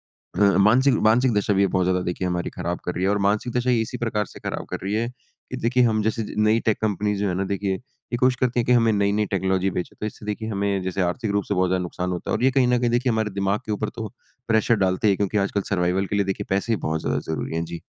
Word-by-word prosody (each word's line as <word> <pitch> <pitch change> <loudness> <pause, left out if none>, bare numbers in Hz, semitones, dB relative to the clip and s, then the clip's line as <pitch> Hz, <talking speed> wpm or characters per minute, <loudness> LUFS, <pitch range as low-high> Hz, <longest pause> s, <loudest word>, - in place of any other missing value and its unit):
अ, 90 - -9 0.2
मानसिक 125 +7 +5
मानसिक 120 +3 +4
दशा 105 0 +1
भी 95 - +2
ये - - +4
बहुत 95 0 +1
ज़्यादा 90 0 +2
देखिए 90 +1 -2
हमारी 90 -1 -2
खराब 85 +1 -3
कर 90 - -3
रही 90 - -1
है 95 - +3
और 105 - +1
मानसिक 105 +4 0
दशा 125 +1 +1
ये 120 -2 +3
इसी 125 +3 -4
प्रकार 110 -3 -1
से - - -13
खराब - - -4
कर - - -3
रही 100 +2 -2
है 115 +2 0 0.4
कि 130 - -4
देखिए 125 +1 +2
हम 110 -2 +2
जैसे 110 +1 0
ज - - -8
नई 110 +2 +3
टेक 110 - +2
कम्पनीज़ 105 -1 0
जो 105 - +1
है 90 - -1
ना 95 +1 -1
देखिए 100 0 -1
ये 125 +2 -8
कोशिश 130 -1 +3
करती 125 -1 +1
हैं - - 0
कि 125 - +3
हमें 115 -2 +4
नई-नई 100 +1 +1
टेक्नोलॉजी 95 0 0
बेचे। 90 -1 -4
तो 105 - -2
इससे 105 - -8
देखिए 110 +1 -3
हमें 100 -2 -1
जैसे 95 +1 -1
आर्थिक 100 +5 -1
रूप 100 0 0
से 100 - -2
बहुत 95 -1 +2
ज़्यादा 90 -1 +1
नुकसान 90 +1 -3
होता 90 - -4
है - - +2
और 125 - -2
ये 130 - +5
कहीं 130 -1 +3
न 125 - +3
कहीं 120 -1 +1
देखिए 120 +1 +1
हमारे 110 -1 0
दिमाग 100 +3 -1
के 105 - -2
ऊपर 105 +1 -2
तो 110 -2 -4 0.4
प्रेशर 110 +1 +3
डालते 95 +3 +1
हैं 100 - +3
क्योंकि 100 +1 0
आजकल 100 0 0
सर्वाइवल 90 +1 +1
के 100 - -2
लिए 100 - +2
देखिए 95 - -3
पैसे 100 +4 0
ही - - +2
बहुत 80 0 -1
ज़्यादा - - -1
ज़रूरी 80 - -3
हैं। 85 - -1
जी। 85 0 -7
105 Hz, 285 wpm, -23 LUFS, 95-115 Hz, 0.4 s, मानसिक